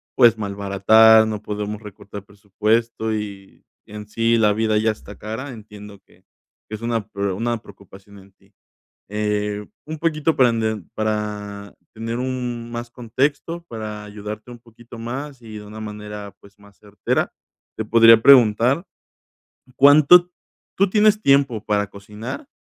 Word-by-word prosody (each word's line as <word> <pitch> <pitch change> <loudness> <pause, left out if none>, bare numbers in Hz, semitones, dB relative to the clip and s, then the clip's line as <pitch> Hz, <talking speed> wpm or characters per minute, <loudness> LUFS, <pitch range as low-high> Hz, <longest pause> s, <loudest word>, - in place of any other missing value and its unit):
pues, 115 -2 +5
malbaratar, 105 +2 +4
no 105 -1 -4
podemos 105 0 -5
recortar 100 -1 -10
presupuesto 110 +3 -1
y 100 -2 -7 0.2
en 105 0 -10
sí 115 +2 +1
la 105 -2 +3
vida 110 0 0
ya 110 +1 +2
está 100 -1 -11
cara. 115 +6 -6
Entiendo 105 -3 -12
que - - -27 0.5
es 110 +1 -7
una 115 -3 -2
pre 100 0 -3
una 115 +4 -2
preocupación 100 0 -16
en 95 +1 -19
ti. - - -30 0.6
Eh, 105 0 -2 0.2
un 155 0 -6
poquito 160 -1 0
para 125 -2 +5
ent 110 -4 -2
para 105 -2 -4 0.2
tener 115 +2 -4
un 125 -2 -4
más 120 0 -6
contexto 140 +8 -2
para 105 -2 -7
ayudarte 105 +2 -8
un 120 - -11
poquito 120 0 -15
más 130 +3 -6
y 110 -2 -9
de 105 - -11
una 110 +1 -10
manera, 105 -1 -8
pues 100 0 -20
más 100 -1 -20
certera, 105 -1 -2 0.4
te 110 - -3
podría 115 0 +6
preguntar, 125 - +5 0.9
¿cuánto 155 +6 +6 0.5
tú 195 0 +3
tienes 210 0 +4
tiempo 135 -5 +2
para 105 -1 0
cocinar? 105 - -9
110 Hz, 145 wpm, -21 LUFS, 105-120 Hz, 0.9 s, podría